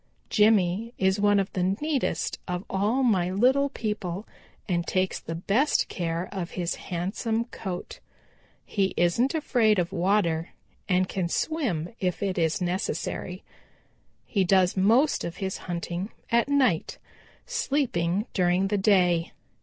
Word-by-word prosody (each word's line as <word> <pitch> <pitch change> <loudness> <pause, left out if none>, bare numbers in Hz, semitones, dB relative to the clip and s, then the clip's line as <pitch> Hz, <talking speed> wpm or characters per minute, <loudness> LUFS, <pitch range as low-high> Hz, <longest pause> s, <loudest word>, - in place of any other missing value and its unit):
Jimmy 210 +1 +3
is 190 +1 +2
one 205 0 +4
of 195 - -2
the 185 - -1 0.2
neatest 300 -3 -1
of 180 +1 -3
all 210 +7 +1
my 190 -8 +2
little 260 +9 +3
people 210 -6 -4 0.4
and 175 -3 -1
takes 185 0 0
the 165 - -6
best 215 - +2
of - - -23
care 170 0 -2
of 185 -4 -4
his 175 -2 -1
handsome 215 +6 -2
coat. 190 -6 -6 0.7
He 195 -2 0
isn't 230 - +2
afraid 235 -8 +2
of 175 -1 0
water 170 -3 +1 0.4
and 185 0 +3
can 185 -3 -2
swim 210 - -1
if 185 +1 -1
it 190 -2 -1
is 165 +3 +1
necessary. 180 +2 -3 0.8
He 200 -4 +1
does 185 0 +3
most 230 +10 +3
of 170 - -5
his 190 -1 -3
hunting 175 +3 -3 0.2
at 235 +3 +3
night, 260 - +2 0.5
sleeping 235 - 0
during 185 +1 +2
the 205 -1 +1
day. 180 -4 +3
190 Hz, 140 wpm, -26 LUFS, 175-225 Hz, 0.8 s, one